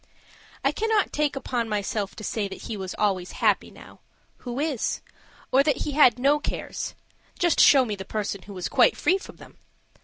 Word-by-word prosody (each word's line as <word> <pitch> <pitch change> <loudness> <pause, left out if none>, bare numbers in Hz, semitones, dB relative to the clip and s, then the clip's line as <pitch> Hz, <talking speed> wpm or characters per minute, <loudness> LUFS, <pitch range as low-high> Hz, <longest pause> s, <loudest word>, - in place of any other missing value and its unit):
I - - +4
cannot 440 -1 0
take 295 -1 0
upon 245 -4 -2
myself 205 -1 -2
to 215 - -9
say 210 -1 -2
that 195 - -9
he 225 - -5
was 190 -2 -6
always 190 -4 0
happy - - +1
now - - -15 0.4
who 245 +1 -6
is? 290 -6 -1 0.5
or 265 - +5
that 285 -2 +1
he 295 - -2
had 270 -5 +5
no 280 +4 +3
cares; - - -5 0.4
just 345 -2 +2
show 270 -3 +7
me 215 -3 -3
the 190 - -7
person 200 -1 -4
who 200 0 -10
is 180 - -3
quite - - +4
free 380 +2 +2
from - - -12
them! - - -16
240 Hz, 190 wpm, -25 LUFS, 205-295 Hz, 0.5 s, show